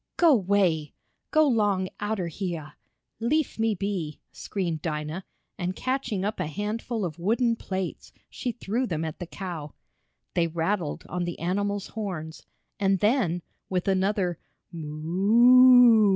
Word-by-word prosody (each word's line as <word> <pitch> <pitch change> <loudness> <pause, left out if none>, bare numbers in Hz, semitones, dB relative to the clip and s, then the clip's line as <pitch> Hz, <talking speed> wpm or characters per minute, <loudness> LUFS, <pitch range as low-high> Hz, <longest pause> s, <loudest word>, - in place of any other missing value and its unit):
"Go 335 -3 +6
'way! 185 - +1 0.3
Go 310 -1 +4
'long 205 -6 +2
outer 205 -3 -1
heah! 165 -3 -5 0.4
Leef 280 +4 0
me 225 -1 +2
be!" 180 -6 -3
screamed 170 -6 -3
Dinah, 155 +2 -3 0.4
and 180 +1 -2
catching 255 -7 -2
up 210 0 -2
a 180 - -1
handful 210 +5 -3
of 165 -1 -6
wooden 230 +6 +2
plates 190 -4 -5 0.2
she 250 - -4
threw 235 +2 -2
them 160 -4 -2
at 160 - -6
the 175 - -5
cow. 170 -6 -6 0.6
They 170 -1 +2
rattled 165 0 -2
on 180 0 -2
the 175 - -4
animal's 200 +3 -1
horns, 175 -8 -5 0.4
and 195 -1 +3
then, 205 -6 +2 0.3
with 180 -1 -1
another 190 -2 +1 0.3
"Moo!" 215 +9 +6
195 Hz, 135 wpm, -26 LUFS, 170-220 Hz, 0.6 s, Go